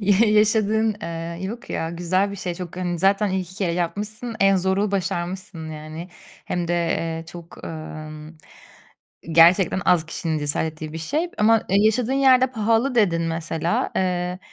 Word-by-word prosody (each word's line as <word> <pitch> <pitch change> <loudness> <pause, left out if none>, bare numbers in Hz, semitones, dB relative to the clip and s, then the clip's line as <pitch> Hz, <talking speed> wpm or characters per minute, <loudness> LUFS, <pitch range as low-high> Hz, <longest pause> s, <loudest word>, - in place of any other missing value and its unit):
ya 205 +2 +4
yaşadığın, 215 +1 +3
eee 170 0 -5
yok 230 +5 -6
ya 165 - -2
güzel 180 +3 0
bir 200 - -6
şey. 180 -2 -4
Çok 175 -1 -8
hani 175 -1 -2
zaten 195 +3 +2
ilk 190 0 -1
2 185 - -12
kere 190 -4 -1
yapmışsın, 210 +7 -3
en 195 0 +5
zoru 190 +2 +1
başarmışsın 180 -3 -3
yani, 155 +3 -8 0.4
hem 175 -1 -2
de, - - +1 0.2
eee, 165 0 -2
çok, 170 0 -11
ımm, 155 0 -8 0.9
gerçekten 175 +3 +5
az 165 -3 +3
kişinin 165 -1 -2
cesaret 145 +2 -1
ettiği 155 0 -8
bir 160 - -5
şey, 305 - -2
ama, 225 +2 +5
e, - - +1
yaşadığın 220 +4 +2
yerde 260 -2 +5
pahalı 230 +1 +1
dedin 180 -8 +3
mesela. 165 0 -1
Eee, 180 -1 -1
180 Hz, 160 wpm, -23 LUFS, 165-210 Hz, 0.9 s, en